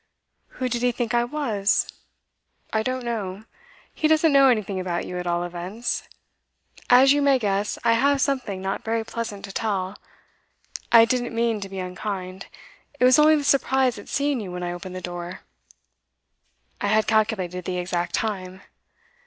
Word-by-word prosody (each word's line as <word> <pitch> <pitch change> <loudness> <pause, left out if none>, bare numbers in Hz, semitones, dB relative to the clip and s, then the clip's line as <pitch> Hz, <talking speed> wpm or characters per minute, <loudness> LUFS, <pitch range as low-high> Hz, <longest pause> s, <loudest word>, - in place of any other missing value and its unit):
'Who 255 - -1
did 240 -1 -2
he 245 0 +3
think 240 -1 -3
I 240 0 +3
was?' 240 -8 0 0.9
'I 220 - +2
don't 255 +2 -3
know. 210 -4 -4 0.5
He 310 - +1
doesn't 315 0 +4
know 275 -1 +7
anything 210 -6 +1
about 175 -2 -2
you, 180 - -5
at 180 - -5
all 175 0 0
events. 180 +7 -4 0.8
As 260 +2 +7
you 290 - +1
may 280 -1 +4
guess, 205 -3 -1
I 230 - +4
have 280 +4 +3
something 255 -9 -1
not 195 +1 -3
very 225 0 -1
pleasant 220 -3 -5
to 200 - -9
tell. 195 -2 -2 1.0
I 230 -1 +8
didn't 240 0 -1
mean 230 -2 0
to 195 - -6
be 195 - -8
unkind; 185 0 -5 0.5
it - - +1
was 255 +3 +6
only 310 +1 +6
the 295 - -1
surprise 265 -4 +2
at - - -12
seeing 280 -2 0
you 195 -4 -6
when 180 0 -5
I 175 - -2
opened 180 +1 -8
the 185 - -5
door. 175 0 -6 1.4
I - - 0
had 215 +1 +3
calculated 195 -5 0
the 180 -1 -2
exact 175 -1 -2
time. 190 -3 -4
215 Hz, 170 wpm, -24 LUFS, 185-250 Hz, 1.4 s, I